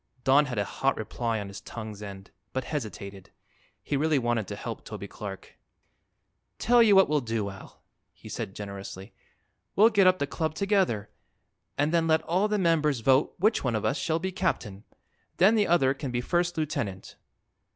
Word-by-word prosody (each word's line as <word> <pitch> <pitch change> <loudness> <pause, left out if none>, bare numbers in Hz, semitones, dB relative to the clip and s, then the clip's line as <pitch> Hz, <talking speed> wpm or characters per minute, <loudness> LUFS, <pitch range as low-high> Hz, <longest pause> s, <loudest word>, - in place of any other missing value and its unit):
Don 140 +2 +5
had 125 -4 -5
a 100 - +1
hot 135 +6 -1
reply 115 +1 -2
on 100 - -5
his 100 0 -9
tongue's 110 -3 -8
end, 100 -1 -9 0.2
but 130 - -1
hesitated. 100 - -6 0.5
He - - -2
really 155 +1 +2
wanted 120 -5 0
to - - -5
help - - -6
Toby - - -7
Clark. 100 -2 -9 1.0
"Tell 240 0 +4
you 215 -3 +6
what 195 - +7
we'll 150 -1 +1
do, 110 -4 -2
Al," 95 - -14 0.3
he - - -15
said 95 - -5
generously; 100 0 -8 0.6
"we'll 215 +3 +7
get 200 -3 +5
up 185 0 +5
the 145 - 0
club 155 +2 -3
together 190 - +1 0.7
and 145 +3 +1
then 165 -1 +2
let 160 0 +3
all 185 +6 +1
the 210 0 0
members 155 - +2
vote 135 +4 +3
which 215 +5 +2
one 125 -4 0
of 110 - -1
us 135 - +1
shall 160 +3 0
be 190 +3 -3
captain. 115 - -2 0.5
Then 195 +5 +6
the 210 -2 +3
other 135 -6 +3
can 140 0 -5
be 120 -1 -1
first 175 +6 0
lieutenant." 140 - -3
140 Hz, 180 wpm, -27 LUFS, 110-175 Hz, 1.0 s, what